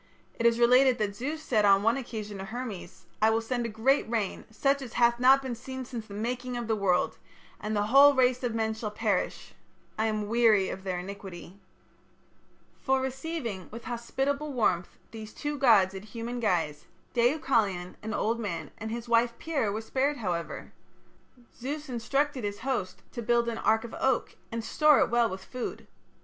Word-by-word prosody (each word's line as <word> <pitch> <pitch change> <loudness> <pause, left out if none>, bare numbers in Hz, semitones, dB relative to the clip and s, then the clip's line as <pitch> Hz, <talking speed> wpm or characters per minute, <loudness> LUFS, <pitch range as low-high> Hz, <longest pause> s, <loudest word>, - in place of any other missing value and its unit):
It 230 - +4
is 230 0 +2
related 250 +2 +5
that 205 -2 -2
Zeus 295 +8 -4
said 220 -7 +2
on 200 -1 +5
one 230 +2 +3
occasion 215 -6 -6
to 190 - -5
Hermes: 200 -5 -7 0.2
"I 220 - +6
will 225 0 +2
send 235 +1 -2
a - - -5
great 230 +5 +1
rain, 220 -5 -2
such 275 +5 +1
as 250 -4 -8
hath 235 0 +3
not 265 +2 +6
been 260 -2 -3
since 260 +2 -7
the 235 -3 -4
making 245 +3 -3
of 240 - -3
the 220 - +1
world, 190 -3 +1 0.4
and 215 +1 -3
the 205 - +2
whole 275 +5 +7
race 255 -1 +3
of 240 -3 -2
men 220 -1 0
shall 220 -1 -4
perish. 210 -3 -2 0.5
I 220 - +2
am 215 -1 -2
weary 220 -4 +4
of 190 - -6
their 185 -2 -2
iniquity." 190 0 -8 1.2
For 265 0 +2
receiving 265 - -4
with 230 +2 -9
hospitable 270 +5 -2
warmth 185 -9 0
these 215 -1 -9
two 295 0 -3
gods 210 -8 +5
in 190 - -6
human 230 +4 -6
guise, 165 -9 0 0.3
Deucalion, 235 - +1
an 220 0 -4
old 230 +2 0
man, 170 -9 -4
and 220 - -5
his 235 +1 -5
wife 235 0 +2
Pyrrha 285 -10 -1
were 215 +2 -3
spared, 275 +5 0
however. 175 -7 -4 0.8
Zeus 290 +3 -5
instructed 270 +3 -1
his 205 +1 -4
host 230 -8 -3
to 240 - -5
build 235 +1 +2
an 230 -1 -2
ark 220 0 +2
of 235 - -8
oak, 265 -2 0 0.2
and 230 0 -3
store 300 -2 +5
it - - +2
well 235 -1 +3
with 190 0 -7
food. 250 -1 -6
230 Hz, 185 wpm, -28 LUFS, 210-255 Hz, 1.2 s, whole